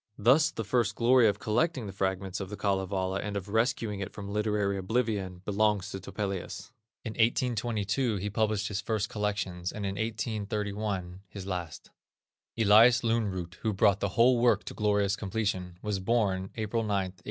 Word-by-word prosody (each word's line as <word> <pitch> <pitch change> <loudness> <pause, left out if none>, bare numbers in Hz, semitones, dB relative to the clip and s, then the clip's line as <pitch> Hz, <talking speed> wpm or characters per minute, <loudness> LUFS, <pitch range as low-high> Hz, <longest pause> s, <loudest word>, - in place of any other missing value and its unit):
Thus 135 +9 +5
the 115 - -5
first 120 +3 +1
glory 120 0 +5
of 100 -1 +1
collecting 130 +5 0
the 100 - -6
fragments 95 0 -2
of 95 -2 -5
the 105 - -6
Kalevala 95 -1 -1
and 105 -1 -3
of 100 0 -5
rescuing 110 -2 0
it 100 0 -4
from 100 -1 -8
literary 105 -2 0
oblivion, 100 -3 -1
belongs 105 -1 +1
to 95 - -5
Topelius. 95 +2 -5 0.3
In 110 - -3
1822 115 0 0
he 100 +1 -3
published 105 0 0
his 100 -2 -2
first 110 -1 -1
collections, 100 -5 -2
and 105 -2 -5
in 95 0 -3
1831, 105 -4 -3
his 95 -1 -8
last. 90 -4 -5 0.7
Elias 115 +3 +6
Lönnrot, 100 -7 -1
who 110 - 0
brought 100 0 +3
the 100 - 0
whole 120 +1 +5
work 115 -4 +3
to - - -7
a - - -16
glorious 105 -2 +2
completion, 95 -4 -3
was 105 -2 -1
born 95 -3 0
April 110 +1 -1
9, 110 - -3
1802. 95 -2 -1
105 Hz, 170 wpm, -29 LUFS, 95-110 Hz, 0.7 s, Elias